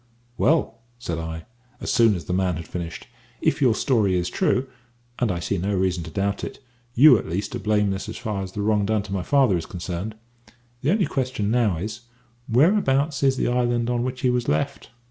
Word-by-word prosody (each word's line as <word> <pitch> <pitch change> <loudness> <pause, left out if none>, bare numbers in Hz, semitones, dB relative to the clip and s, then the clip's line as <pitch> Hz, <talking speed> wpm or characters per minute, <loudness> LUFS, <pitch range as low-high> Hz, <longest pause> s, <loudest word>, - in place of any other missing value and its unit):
"Well," 140 -5 +1 0.2
said 85 -9 -4
I, 80 0 -6 0.3
as - - -2
soon 115 -4 +5
as 85 - -6
the 90 - -3
man 90 -1 +1
had 85 +1 -7
finished, 85 -2 -6 0.3
"if 160 - 0
your 125 -5 +4
story 110 -9 +2
is 90 0 -1
true 130 +2 +1 0.5
and 120 -5 +1
I 90 - -2
see 85 - -2
no 100 +3 -1
reason 90 -1 0
to - - -7
doubt 100 +4 -2
it - - -5 0.4
you 130 -2 +8
at - - -7
least 100 +7 -3
are 120 - -3
blameless 105 -1 0
as 110 - -6
far 105 -5 -3
as 95 -1 -6
the 105 - -3
wrong 105 -1 +2
done 110 -1 +1
to 100 - -7
my 95 - -1
father 130 -2 +3
is 80 - -5
concerned. 90 +4 -5 0.7
The 140 - 0
only 195 +1 +3
question 130 -6 -2
now 115 -7 +2
is, 110 +6 -5 0.5
whereabouts 140 - +3
is 135 -1 +3
the - - 0
island 120 -1 +1
on 120 -1 0
which 130 0 -4
he 130 -2 +3
was 125 -1 -1
left?" 140 0 -1
110 Hz, 210 wpm, -24 LUFS, 95-125 Hz, 0.7 s, you